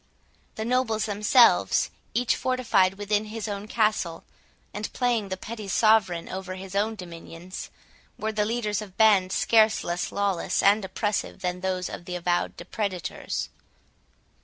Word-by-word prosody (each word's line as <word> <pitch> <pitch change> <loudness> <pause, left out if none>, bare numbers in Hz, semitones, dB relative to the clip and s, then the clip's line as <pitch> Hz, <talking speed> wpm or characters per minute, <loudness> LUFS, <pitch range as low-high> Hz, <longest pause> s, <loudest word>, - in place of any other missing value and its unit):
The 220 - -4
nobles 235 -3 +1
themselves, 210 +4 +4 0.2
each 245 0 +2
fortified 225 -7 +2
within 205 +1 0
his 220 +1 -5
own 205 0 -5
castle, 215 -7 0 0.5
and 210 +1 -4
playing 235 -5 0
the 190 - -3
petty 215 +1 -7
sovereign 195 -4 +3
over 185 0 -5
his 190 0 -9
own 210 +3 0
dominions, 175 -1 -9 0.5
were 220 +1 -2
the 210 -1 0
leaders 215 -2 -1
of 195 -3 -11
bands 200 -4 +4
scarce 220 -1 +4
less 175 +1 -2
lawless 200 -3 0
and 205 +1 +5
oppressive 200 +1 -2
than 180 -1 -2
those 185 -1 -1
of 175 - -8
the 180 - -5
avowed 175 0 -1
depredators. 185 -1 -4
205 Hz, 140 wpm, -26 LUFS, 185-220 Hz, 0.5 s, and